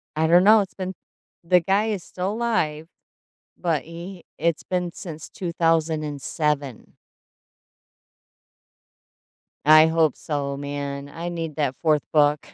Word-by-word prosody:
I 160 +1 +2
don't 175 +2 +6
know, 215 +2 +7
it's 195 - -6
been 185 0 -5 0.5
the 180 +1 +4
guy 195 +5 +2
is 205 -5 -2
still 185 +3 -4
alive, 160 -10 -1 0.7
but 165 -5 -1
he 170 +2 -9
it's 170 -2 0
been 180 -1 -2
since 160 -5 -8
2007. 155 - -1 2.7
I 155 +1 +8
hope 160 -3 +2
so, 140 -2 -3
man. 140 0 -5
I 170 +4 -5
need 165 -3 -5
that 145 -4 0
4th 155 -3 +2
book. 150 -1 +3
160 Hz, 120 wpm, -23 LUFS, 150-180 Hz, 2.7 s, I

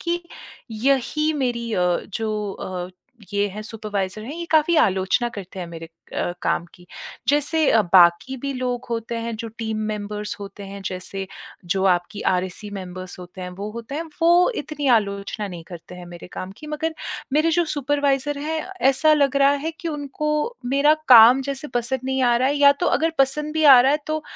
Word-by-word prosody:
कि 345 0 -2 0.5
यही 275 +6 +1
मेरी 235 -2 -2
अ, 180 -2 +2
जो 210 0 -3
अ, 180 -2 -6 0.4
ये 205 0 +1
हैं 205 +2 -7
सुपरवाइज़र 215 -2 -4
हैं, 275 +6 -6
ये 340 - -4
काफ़ी 315 +2 +4
आलोचना 195 +3 +2
करते 195 -4 -9
हैं 180 - -4
मेरे 165 -1 -9 0.3
अ, 175 - -1
काम - - 0
की। 180 -1 -18 0.4
जैसे 295 +2 +2
अ, 225 - +5
बाकी 175 +8 +5
भी 275 - -2
लोग 250 -1 -3
होते 230 0 -3
हैं, 230 0 -4
जो 230 +1 -6
टीम 220 -1 -3
मेंबर्स 210 0 -4
होते 200 0 -9
हैं, 195 0 -8
जैसे 190 +1 -4 0.5
जो 190 - -1
आपकी 175 +4 -5
आरएससी 185 +3 -3
मेंबर्स 185 -1 -7
होते 180 +1 -11
हैं, 180 - -5
वो 200 +4 -6
होते 235 +4 -7
हैं। 315 - -2 0.2
वो 345 +5 +5
इतनी 295 -1 -5
आलोचना 200 0 -3
नहीं 175 -3 -8
करते 175 0 -10
हैं 180 -1 -10
मेरे 175 0 -10
काम 185 +1 -6
की। 305 - -10
मगर 305 +2 -3 0.4
मेरे 310 +3 +3
जो 345 +1 +2
सुपरवाइज़र 285 -1 0
हैं 315 +2 -2 0.3
ऐसा 310 +4 +3
लग 280 -2 +2
रहा 275 0 +5
है 325 - -1
कि 335 - -3
उनको 295 0 -3 0.4
मेरा 280 +4 +4
काम 245 +1 +9
जैसे 280 +2 -4
पसंद 245 +2 0
नहीं 265 0 0
आ 240 -1 +4
रहा 255 +2 +2
है। 285 - 0
या 285 0 +7
तो - - +3
अगर 325 +2 +2
पसंद 300 +3 +2
भी 315 0 +1
आ 270 -4 +9
रहा 265 +3 +4
है 300 - +2
तो 310 0 -2
235 Hz, 190 wpm, -22 LUFS, 195-290 Hz, 0.5 s, काम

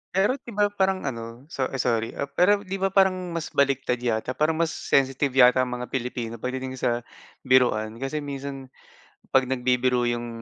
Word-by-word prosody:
Pero 205 +8 +2
'di 240 - -11
ba 205 0 +3
parang 190 -2 0
ano, 115 -1 -6
so 130 -5 -1
ay 135 - -6
sorry. 115 -2 +1 0.3
Pero 200 +3 +4
di 195 -1 -4
ba 195 - +2
parang 185 -2 +1
mas 165 - -4
baliktad 135 -3 +1
yata, 120 0 -1
parang 155 +4 +1
mas 165 0 0
sensitive 135 -2 +1
yata 125 -1 +6
ang 125 - -4
mga 125 0 -7
Pilipino 120 -2 -4
pagdating 130 +1 -4
sa 120 -1 0 0.4
biruan. 120 -4 +3
Kasi 145 +2 -3
minsan 135 -1 -6 0.6
pag 130 -1 +3
nagbibiro 125 -1 +1
yung 120 0 -1
130 Hz, 175 wpm, -25 LUFS, 125-160 Hz, 0.6 s, yata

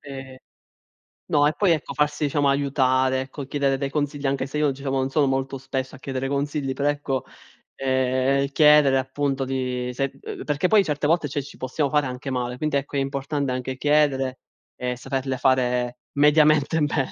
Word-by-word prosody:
E 135 -2 -9 0.9
no, 145 0 +4
e 150 - +1
poi 195 0 +2
ecco 155 -4 -1
farsi 150 0 0
diciamo 145 0 +1
aiutare, 130 -2 +2
ecco 135 +1 -7
chiedere 140 -1 0
dei 140 0 -2
consigli, 145 -1 -2
anche 135 -1 0
se 145 - -5
io 150 -2 +2
diciamo 135 0 -3
non 130 0 0
sono 145 0 +2
molto 135 +1 -1
spesso 130 0 -4
a - - -11
chiedere 135 0 -4
consigli, 140 0 -1
però 140 +1 -1
ecco, 145 -3 -2 0.5
ehm, 130 +1 +1
chiedere 150 -3 +6
appunto 135 +1 -1
di 125 -1 -2
se, 135 +2 -3
ehm 430 -2 -7
perché 150 +4 +1
poi 210 -2 +5
certe 150 -2 -2
volte 160 -1 +2
cioè 145 +1 -3
ci 140 - -13
possiamo 140 +3 -1
fare 150 0 +2
anche 125 +2 -6
male. 125 -1 -2
Quindi 155 +1 -1
ecco 140 +1 -5
è - - +2
importante 140 0 -2
anche 130 +1 -3
chiedere 135 -2 +1 0.4
e 125 0 -3
saperle 130 +1 -3
fare 125 -1 +1 0.2
mediamente 150 +1 +4
bene, 145 -2 0
135 Hz, 180 wpm, -24 LUFS, 130-145 Hz, 0.9 s, chiedere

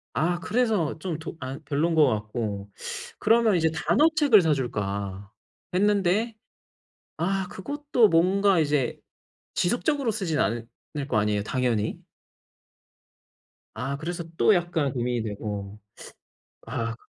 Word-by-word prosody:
아 175 +2 +1
그래서 210 - 0
좀 170 -2 -3
더 160 +1 -7
아 130 +1 -5
별론 155 +4 +1
것 155 -2 +6
같고. 105 -3 -3 0.5
그러면 225 -1 +4
이제 160 -2 +2
'단어 220 - +3
책을 285 -10 +6
사 160 -2 +3
줄까.' 100 -6 -3 0.4
했는데 205 +3 +2 0.8
아 190 +3 0
그것도 285 +2 +1
뭔가 190 +2 +3
이제 145 -5 +1 0.6
지속적으로 245 - +1
쓰진 190 -8 -2
않을 115 +3 0 0.4
거 115 - +1
아니에요, 105 -1 +1
당연히? 115 -2 -1 1.7
아 140 +1 -3
그래서 170 +3 -4
또 215 - +5
약간 170 -6 0
고민이 120 -2 -1
되고. 105 -1 -5 0.9
아 115 0 -3
160 Hz, 230 characters per minute, -26 LUFS, -, 1.7 s, 것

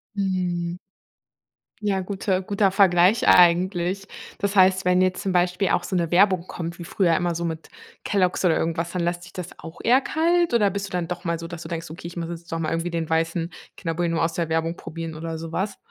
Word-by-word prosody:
Mhm. 180 -3 -1 1.0
Ja, 200 -2 0
gute 190 0 -1
guter 200 0 +1
Vergleich 190 +1 +4
eigentlich. 180 +2 +4 0.3
Das 200 +1 -1
heißt, 190 0 +5
wenn 180 0 +4
jetzt 185 +1 +1
zum 195 - -1
Beispiel 180 +2 +1
auch 175 - +1
so 190 - -3
'ne 170 -2 +1
Werbung 185 0 +3
kommt 170 0 -6
wie - - -6
früher 170 -1 +1
immer, 175 -1 0
so 170 +1 -2
mit 160 -1 -5 0.3
Kellogg's 185 -2 +1
oder 170 -3 +3
irgendwas, 165 +1 -1
dann 180 - -1
lässt 175 +1 -1
sich 170 - -13
das 180 -1 -6
auch 165 +1 -10
eher 255 +4 +5
kalt 335 -1 +1
oder 205 -4 +3
bist 200 0 -3
du - - -13
dann 180 -2 -2
doch 180 0 -5
mal 170 -1 -1
so, 165 0 -7
dass 170 -1 -8
du 160 - -7
denkst: 165 -2 -5
„Okay, 170 +1 -8
muss 170 -1 -4
jetzt 170 0 -8
doch 165 - -1
mal 160 -1 -2
irgendwie 165 +1 -1
den 165 -2 -2
weißen 165 +1 0 0.2
Kinderbueno 165 -1 -1
aus 165 0 +1
der 170 -1 -2
Werbung 165 +1 0
probieren“ 165 0 -7
oder 160 +1 -5
sowas? 165 +5 -3
175 Hz, 215 wpm, -24 LUFS, 165-190 Hz, 1.0 s, heißt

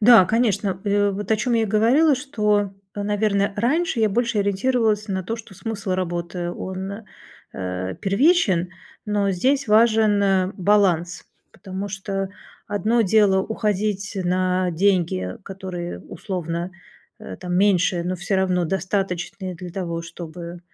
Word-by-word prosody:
Да, 225 -3 +8
конечно. 205 -3 +1
Э, 205 0 +2
вот 200 +1 -5
о 220 - +4
чём 235 +3 0
я 225 - +3
и - - +2
говорила, 245 +9 +4
что, 210 -7 0 0.2
э, 205 - -3
наверно, 205 -1 +1
раньше 265 +4 +1
я 220 - +4
больше 235 +1 0
ориентировалась 215 +1 +1
на 190 -1 -2
то, 225 +6 -3
что 215 -3 -12
смысл 200 -2 -4
работы, 175 -1 -2
он, 190 +2 -5 0.6
э, 95 0 -4
первичен. 195 - +3 0.4
Но 205 -1 +1
здесь 255 +7 +1
важен, 215 -2 +4
э, 190 -1 +2
баланс, 180 -3 +2 0.3
потому 190 +1 -6
что 195 0 -3 0.4
одно 220 +3 +1
дело- 200 -2 +4
уходить 210 -2 -2
на 185 0 +1
деньги, 165 - +1
которые 185 - -6
условно, 170 - -4 0.5
э, 95 - -8
там, 180 0 -4
меньше, 180 -3 +3
но 185 +1 -2
всё 190 +2 -1
равно 185 -2 +1
достаточные 185 0 -2
для 175 +1 -8
того, 170 -2 -4
чтобы 170 +1 -8
195 Hz, 140 wpm, -22 LUFS, 180-215 Hz, 0.6 s, Да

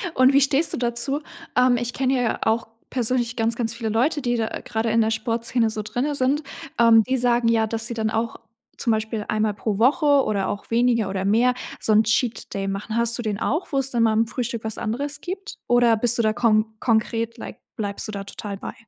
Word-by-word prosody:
Und 260 +1 +5
wie 280 - +5
stehst 280 +3 +3
du - - -2
dazu? 240 +4 -1 0.4
Ähm, 250 0 +4
ich 240 0 -3
kenne 265 0 0
ja 235 - -1
auch 225 +1 0 0.2
persönlich 245 -1 0
ganz 225 0 +1
ganz 230 -2 -2
viele 230 -1 -4
Leute, 265 +8 +1
die 245 -2 0
da 225 - 0
gerade 225 +1 -2
in 230 +1 +3
der 220 0 +1
Sportszene 230 +1 0
so 220 0 -3
drinnen 260 +7 -2
sind, 280 +3 +1 0.3
äh, 235 -1 +5 0.2
die 260 +1 +1
sagen, 240 -1 +2
ja, 225 -1 +3
dass 225 +1 -1
sie - - -4
dann 220 -1 -1
auch 225 +1 -2 0.4
zum 235 - 0
Beispiel 220 0 -2
einmal 215 -1 0
pro 205 0 -3
Woche 280 +4 +4
oder 200 -2 -1
auch 205 - -6
weniger 230 -3 +2
oder 190 0 -2
mehr 235 +5 +3 0.3
so 215 - +1
'n 215 +1 +5
Cheat-Day 220 -3 -1
machen. 195 +3 -4
Hast 235 0 +1
du - - -3
den 210 -3 -3
auch, 315 +11 -1
wo 275 - 0
es 270 0 0
dann 235 -2 +2
mal 220 -1 +3
im 225 +1 +2
Frühstück 235 -1 -4
was 220 -1 -3
anderes 280 +6 -3
gibt 385 +3 -6
oder 245 -1 +4
bist 235 +2 +3
du - - +2
da 215 0 +2
kon 215 -2 +3
konkret, 230 0 0
like - - -9 0.2
bleibst 205 -1 -4
du 215 - -5
da 200 -1 -5
total 200 0 -7
bei? - - -7
230 Hz, 225 wpm, -23 LUFS, 220-250 Hz, 0.4 s, Und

